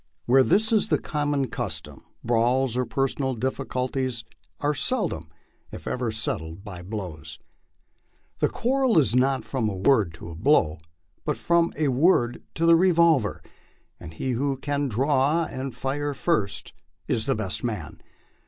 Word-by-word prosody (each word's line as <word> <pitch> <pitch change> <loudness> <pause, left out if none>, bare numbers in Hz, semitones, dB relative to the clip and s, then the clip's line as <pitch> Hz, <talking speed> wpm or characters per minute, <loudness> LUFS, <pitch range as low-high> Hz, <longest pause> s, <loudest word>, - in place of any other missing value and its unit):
Where 130 +2 +5
this 215 - +3
is 220 -1 +3
the - - +2
common 145 -3 -1
custom, 80 - -5 0.2
brawls 120 +2 +2
or 125 -1 0
personal 135 +1 -1
difficulties 130 -1 -2 0.4
are 145 +1 +1
seldom 145 - 0 0.4
if - - -9
ever 125 -2 -2
settled 95 -5 -2
by 95 -5 -8
blows. 90 -6 -6 1.0
The - - +2
quarrel 260 -2 +1
is 125 -7 +4
not 130 +1 +2
from 120 -5 -1
a 100 - -4
word 95 -4 +2
to 80 +1 -9
a - - -8
blow, 80 - +2 0.4
but - - -1
from 170 0 +2
a 150 -2 +1
word 125 -3 +2
to 165 - 0
the 165 0 +7
revolver, 165 - +3 0.6
and 80 - -9
he 130 +11 -3
who 135 +3 -1
can 145 +1 -1
draw 135 +6 +2
and 130 -3 -5
fire 140 +3 -2
first 130 - -1 0.3
is 110 - 0
the 135 - +2
best 105 -4 -3
man. 105 -11 -4
130 Hz, 150 wpm, -25 LUFS, 110-145 Hz, 1.0 s, the